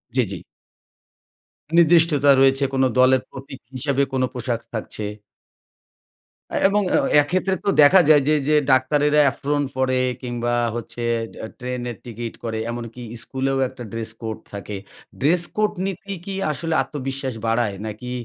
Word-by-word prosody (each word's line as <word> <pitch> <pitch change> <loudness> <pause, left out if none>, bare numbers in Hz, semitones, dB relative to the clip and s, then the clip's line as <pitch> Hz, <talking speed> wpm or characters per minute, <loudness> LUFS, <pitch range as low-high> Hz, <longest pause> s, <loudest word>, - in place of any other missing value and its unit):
জ্বি, 130 - +4
জ্বি। 95 - -4 1.4
নির্দিষ্টতা 160 -4 +5
রয়েছে 135 +1 +4
কোনো 130 0 +3
দলের 130 0 +5
প্রতীক 135 -1 -10 0.2
হিসেবে 140 +1 +1
কোনো 130 -1 +2
পোশাক 120 -2 -3
থাকছে 110 -1 -4 1.6
এবং 205 +1 +2
আ - - +5 0.2
এক্ষেত্রে 185 +5 0
তো - - +2
দেখা 165 +7 +7
যায় 150 -2 +7
যে 155 - +4 0.2
যে, 155 - +4 0.2
ডাক্তারেরা 145 +3 +3
এপ্রোন 145 +3 -1
পড়ে 130 0 +1 0.2
কিংবা 120 -1 -2 0.2
হচ্ছে 120 +1 -6 0.4
এ - - -4
ট্রেনের 125 -1 -4
টিকিট 120 0 -6
করে। 115 -1 -3
এমনকি 120 0 -7 0.2
স্কুলেও 135 0 -2
একটা 125 - -10
ড্রেস 115 -1 -4
কোড 110 -1 -4 0.2
থাকে। 100 +1 -6 0.4
ড্রেস 165 +5 +2
কোড 215 0 +2
নিতি 195 +1 -5
কি 195 - -5 0.2
আসলে 160 +3 -3
আত্মবিশ্বাস 135 -3 -4
বাড়ায়? 115 -3 +1
নাকি 110 +3 -6
130 Hz, 140 wpm, -22 LUFS, 120-150 Hz, 1.6 s, দেখা